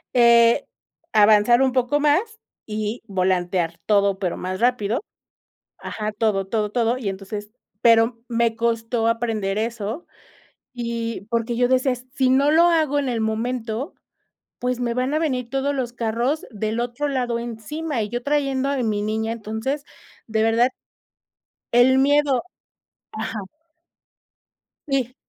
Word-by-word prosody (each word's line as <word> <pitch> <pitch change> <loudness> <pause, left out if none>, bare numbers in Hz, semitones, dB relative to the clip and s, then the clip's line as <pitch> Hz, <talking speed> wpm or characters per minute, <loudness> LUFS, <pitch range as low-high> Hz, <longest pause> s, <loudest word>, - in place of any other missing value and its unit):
Eh, 235 -1 +5 0.5
avanzar 215 +3 +5
un 265 -1 +3
poco 255 +3 +1
más 295 +1 +4 0.5
y 215 +2 -3
volantear 180 -3 0
todo 200 -2 +2
pero 180 -3 -1
más 185 +1 -4
rápido, 235 -2 +1 0.8
ajá, 215 -1 -4
todo, 205 -3 0
todo, 210 0 -1
todo, 235 +1 +1
y 230 -6 -3
entonces 205 +2 -6 0.3
pero 230 0 +4
me 235 -1 +1
costó 230 0 0
aprender 225 -4 -1
eso, 225 +6 -3 0.7
y 230 -3 -4
porque 235 0 -1
yo 245 +1 +3
decía: 260 +1 +2
"Eh - - -3 0.2
sí 260 -3 +2
no 275 +3 +4
lo 325 +2 +5
hago 315 -4 +3
en 280 -2 -1
el 235 -2 -1
momento, 225 - -2 0.6
pues, 250 0 -2
me 240 -1 0
van 255 +3 0
a 310 - +1
venir 255 -7 -1
todos 275 +2 -1
los 250 -3 -2
carros 240 +5 -1
del 220 +1 -2
otro 245 +4 -2
lado 250 -4 -1
encima," 240 +4 -4
y 210 - -3
yo 240 +3 -4
trayendo 275 -2 0
a 280 - 0
mi 215 -3 0
niña, 220 +1 -1
entonces, 230 +6 -4 0.4
de 220 -1 0
verdad. 225 +2 +3 1.1
El 250 +2 +6
miedo 280 -1 +3 0.7
ajá. 220 0 -4 1.5
Sí, 260 -3 -1
235 Hz, 140 wpm, -22 LUFS, 220-260 Hz, 1.5 s, El